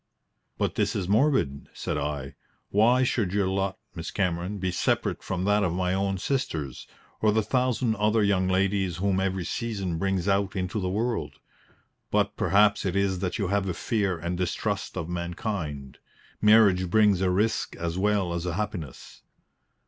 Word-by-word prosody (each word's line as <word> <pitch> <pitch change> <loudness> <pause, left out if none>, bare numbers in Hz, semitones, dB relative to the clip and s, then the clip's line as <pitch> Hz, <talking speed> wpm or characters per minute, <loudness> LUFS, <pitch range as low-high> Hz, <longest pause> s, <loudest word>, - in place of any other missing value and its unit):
"But - - 0
this - - 0
is 95 -3 -2
morbid," 105 - +1
said - - -3
I. 70 -2 -3 0.4
"Why 120 +5 +4
should 110 -7 0
your 100 -2 +2
lot, 95 0 -1 0.2
Miss 85 -2 -6
Cameron, 90 +1 -1
be 95 -1 -1
separate - - 0
from 95 -1 -3
that 105 +2 +3
of 90 -4 0
my 90 0 0
own 95 0 0
sisters, 85 - -3 0.3
or 110 - +4
the 110 +1 +2
thousand 125 -2 +1
other 105 +1 +2
young 95 -2 +2
ladies 95 -1 +1
whom 95 0 +1
every 95 -2 -1
season 100 -9 -3
brings 95 -1 0
out 100 0 +1
into 95 +3 -2
the 90 - -1
world? 105 -5 -1 0.8
But - - +1
perhaps 100 +1 +3
it 95 -2 -1
is 100 -2 +1
that 90 -1 -2
you 100 -4 -1
have 100 -1 0
a 90 - -2
fear 100 -7 0
and 85 +2 -3
distrust 90 -1 -2
of 80 - -3
mankind. 85 -5 -4 0.4
Marriage 105 -4 +5
brings 105 -1 +4
a 95 - +2
risk 105 +5 0
as 85 0 -3
well 100 -3 +1
as 85 +1 -3
a 85 - -2
happiness." 95 - -5
95 Hz, 170 wpm, -26 LUFS, 90-105 Hz, 0.8 s, Marriage